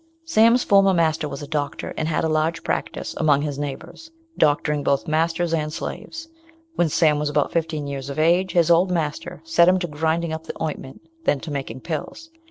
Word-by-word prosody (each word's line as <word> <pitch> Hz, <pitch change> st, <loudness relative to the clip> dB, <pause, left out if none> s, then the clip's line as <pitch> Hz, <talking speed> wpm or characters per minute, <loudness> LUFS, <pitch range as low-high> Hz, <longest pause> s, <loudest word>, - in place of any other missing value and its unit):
Sam's 235 Hz, -5 st, +4 dB
former 195 Hz, -1 st, +4 dB
master 160 Hz, -2 st, +1 dB
was 140 Hz, +1 st, -7 dB
a -, -, -7 dB
doctor, 145 Hz, -2 st, -3 dB
and 155 Hz, -, -2 dB
had 160 Hz, -, 0 dB
a -, -, +2 dB
large 155 Hz, +1 st, 0 dB
practice -, -, -3 dB
among 145 Hz, -3 st, +3 dB
his 145 Hz, -2 st, -3 dB
neighbours, 160 Hz, -, -7 dB, 0.3 s
doctoring 150 Hz, 0 st, +2 dB
both 140 Hz, +4 st, 0 dB
masters 165 Hz, +2 st, 0 dB
and 155 Hz, -2 st, -1 dB
slaves. 325 Hz, -, -6 dB, 0.5 s
When 175 Hz, -, +2 dB
Sam 150 Hz, -1 st, +3 dB
was 150 Hz, 0 st, -1 dB
about 145 Hz, 0 st, 0 dB
fifteen 160 Hz, -3 st, -2 dB
years 140 Hz, -1 st, -5 dB
of 140 Hz, -, -6 dB
age, 175 Hz, +4 st, +2 dB
his 170 Hz, -1 st, +3 dB
old 175 Hz, +3 st, +4 dB
master 155 Hz, -4 st, -3 dB
set 170 Hz, +1 st, +4 dB
him 185 Hz, +1 st, +5 dB
to 180 Hz, -1 st, -2 dB
grinding 160 Hz, +2 st, -1 dB
up 160 Hz, 0 st, -6 dB
the -, -, -8 dB
ointment, 150 Hz, -4 st, -5 dB, 0.2 s
then 145 Hz, -, +2 dB
to 160 Hz, -, -7 dB
making 135 Hz, -3 st, -5 dB
pills. 175 Hz, -, -6 dB
160 Hz, 195 wpm, -22 LUFS, 150-170 Hz, 0.5 s, him